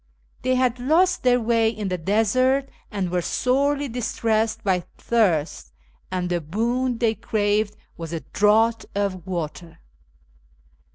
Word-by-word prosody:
They 255 Hz, 0 st, +1 dB
had 250 Hz, -1 st, +1 dB
lost 340 Hz, +8 st, +2 dB
their 250 Hz, -1 st, +3 dB
way 230 Hz, -1 st, +2 dB
in 210 Hz, -3 st, -4 dB
the 180 Hz, -, -1 dB
desert 255 Hz, +9 st, +2 dB, 0.2 s
and 195 Hz, -4 st, -3 dB
were 180 Hz, 0 st, +1 dB
sorely 280 Hz, +8 st, +1 dB
distressed 225 Hz, -2 st, -1 dB
by 185 Hz, -3 st, +1 dB
thirst, 160 Hz, -, 0 dB, 0.4 s
and 180 Hz, -1 st, -2 dB
the 175 Hz, -1 st, -1 dB
boon 235 Hz, -, -1 dB
they 230 Hz, -2 st, +2 dB
craved 210 Hz, 0 st, 0 dB, 0.2 s
was 165 Hz, -2 st, -6 dB
a 165 Hz, -2 st, -3 dB
draught 220 Hz, +2 st, +2 dB
of 195 Hz, -3 st, -2 dB
water. 170 Hz, -1 st, -5 dB
220 Hz, 130 wpm, -23 LUFS, 185-245 Hz, 0.4 s, their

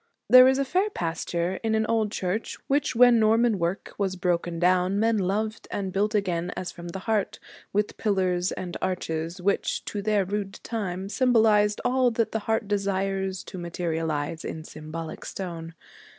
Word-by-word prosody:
There 255 Hz, 0 st, +9 dB
is 265 Hz, +1 st, +3 dB
fair 375 Hz, +8 st, +1 dB
pasture 170 Hz, -, -2 dB
in 220 Hz, -1 st, +1 dB
an 220 Hz, 0 st, +2 dB
old 220 Hz, -2 st, +1 dB
church 190 Hz, +4 st, -2 dB
which, 275 Hz, -2 st, 0 dB
when 245 Hz, -1 st, +7 dB
Norman 220 Hz, -1 st, +3 dB
work 170 Hz, +3 st, -2 dB
was 195 Hz, -2 st, 0 dB
broken 175 Hz, -1 st, -1 dB
down, 180 Hz, +3 st, +2 dB
men 225 Hz, 0 st, +2 dB
loved 215 Hz, +4 st, -2 dB
and 190 Hz, -2 st, -3 dB
built 210 Hz, +2 st, +1 dB
again 180 Hz, -4 st, 0 dB
as 185 Hz, -, -4 dB
from 175 Hz, -1 st, -9 dB
the 170 Hz, -, -5 dB
heart, 215 Hz, -3 st, 0 dB, 0.3 s
with 210 Hz, +1 st, -1 dB
pillars 185 Hz, -3 st, +1 dB
and 175 Hz, -2 st, -5 dB
arches, 165 Hz, -1 st, -2 dB
which, 200 Hz, +2 st, 0 dB
to 205 Hz, -, -3 dB
their 210 Hz, -1 st, +1 dB
rude 200 Hz, 0 st, -4 dB
time, 195 Hz, -5 st, -3 dB
symbolized 220 Hz, -3 st, +3 dB
all 255 Hz, 0 st, +3 dB
that 230 Hz, -1 st, 0 dB
the 220 Hz, -, -1 dB
heart 220 Hz, -1 st, +1 dB
desires 195 Hz, -2 st, -1 dB
to 185 Hz, -, -8 dB
materialize, 165 Hz, -2 st, -2 dB
in 160 Hz, -, -5 dB
symbolic 155 Hz, +1 st, -7 dB
stone. 165 Hz, -3 st, -6 dB
195 Hz, 165 wpm, -26 LUFS, 175-220 Hz, 0.3 s, There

